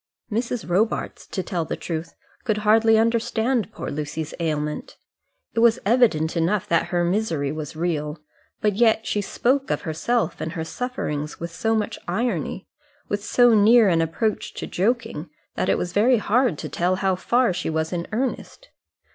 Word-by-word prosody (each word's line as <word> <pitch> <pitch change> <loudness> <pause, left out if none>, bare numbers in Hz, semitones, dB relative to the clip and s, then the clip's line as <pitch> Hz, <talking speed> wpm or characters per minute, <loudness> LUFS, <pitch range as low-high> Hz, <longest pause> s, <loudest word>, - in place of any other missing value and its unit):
Mrs. 230 +2 -2
Robarts, 200 +6 -1
to 190 - -3
tell 175 -1 -2
the - - -4
truth, 165 -1 -5 0.3
could 215 -3 0
hardly 225 +1 +5
understand 230 0 +1
poor - - -6
Lucy's 150 +1 -4
ailment. 150 -2 -3 0.6
It - - 0
was 230 -1 +5
evident 205 -9 +3
enough 185 +5 +1
that 165 - +2
her 175 -1 0
misery 170 -6 0
was 155 -1 -6
real; 155 -2 -2 0.4
but 210 -2 +1
yet 225 0 +3
she 210 - 0
spoke 260 +7 0
of - - 0
herself 175 +4 -1
and 160 - -3
her 165 -2 -3
sufferings 160 - -4
with 170 0 -5
so 225 +6 0
much 220 +1 -2
irony, 200 - -2 0.4
with 205 0 -2
so 245 +1 +4
near 220 +1 +6
an 165 -2 +3
approach 205 +7 -2
to - - -4
joking, 195 -6 -1 0.2
that - - -1
it - - +3
was 175 0 -3
very 235 +5 +4
hard 225 - +2
to - - -5
tell 180 +2 0
how 190 0 +1
far 235 +3 +2
she 180 -1 -3
was 160 +1 -1
in 170 -1 -3
earnest. 260 - -3
200 Hz, 170 wpm, -23 LUFS, 165-230 Hz, 0.6 s, near